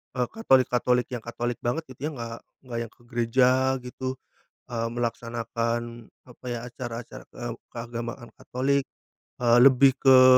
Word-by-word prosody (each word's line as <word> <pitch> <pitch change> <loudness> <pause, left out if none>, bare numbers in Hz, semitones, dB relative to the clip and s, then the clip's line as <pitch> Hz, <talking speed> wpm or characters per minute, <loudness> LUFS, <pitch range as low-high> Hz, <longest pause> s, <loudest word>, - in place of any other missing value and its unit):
eee, 125 -1 +1
Katolik-Katolik 125 - +3
yang 125 - -2
Katolik 120 0 -3
banget 120 +7 -1
gitu 135 +4 -4
yang 155 - -4
nggak 115 -2 -6 0.2
nggak 125 -3 -5
yang - - -23
ke - - -26
gereja 125 +3 +3
gitu, 130 +1 -4 0.5
eee, 115 -2 -2
melaksanakan, 115 0 -3 0.2
apa 125 0 -17
ya 120 - -2
acara-acara, 120 -1 -7 0.2
eee, 120 -1 -4 0.2
keagamaan 120 0 -6
Katolik, 140 +2 0 0.6
eee, 120 0 +6
lebih 135 +1 +7
ke, 130 -1 +8
120 Hz, 140 wpm, -26 LUFS, 120-130 Hz, 0.6 s, ke